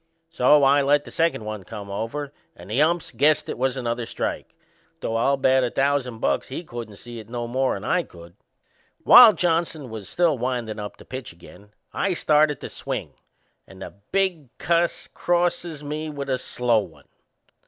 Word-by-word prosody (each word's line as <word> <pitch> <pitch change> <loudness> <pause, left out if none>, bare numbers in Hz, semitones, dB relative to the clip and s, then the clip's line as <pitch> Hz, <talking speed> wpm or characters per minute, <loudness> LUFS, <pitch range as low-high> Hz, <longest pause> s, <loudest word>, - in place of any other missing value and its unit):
So 145 -1 +4
I 140 +1 +5
let 145 +1 +2
the - - -11
second 165 -9 0
one 105 -2 -5
come 100 +1 -8
over 135 +8 -4 0.2
and 90 +4 -12
the 125 +6 +2
umps 170 +2 +1
guessed 145 +6 +2
it - - -4
was 130 0 0
another 120 -2 -3
strike, - - -4 0.4
though 115 - -3
I'll 135 +5 +2
bet 130 0 +3
a 125 - 0
thousand 135 -3 0
bucks - - 0
he 135 +6 -6
couldn't 120 -8 -8
see 120 +3 -10
it 110 0 -12
no 120 0 -4
more'n 130 -5 -1
I 180 - +1
could. 85 - -14 0.7
While 235 -3 +9
Johnson 165 - -1
was 105 -4 -7
still 165 -7 +1
windin' 120 -3 -3
up 105 -1 -7
to - - -15
pitch 130 -7 -7
again 90 +4 -16 0.2
I 195 -2 0
started 150 -3 +2
to - - -6
swing - - -5 0.5
and 95 0 -11
the - - -9 0.2
big 185 -8 0
cuss 170 +1 0
crosses 175 -3 -1
me 155 +2 -4
with 140 -2 -5
a 130 - 0
slow 125 -3 +1
one. 105 - -10
130 Hz, 180 wpm, -23 LUFS, 115-155 Hz, 0.7 s, While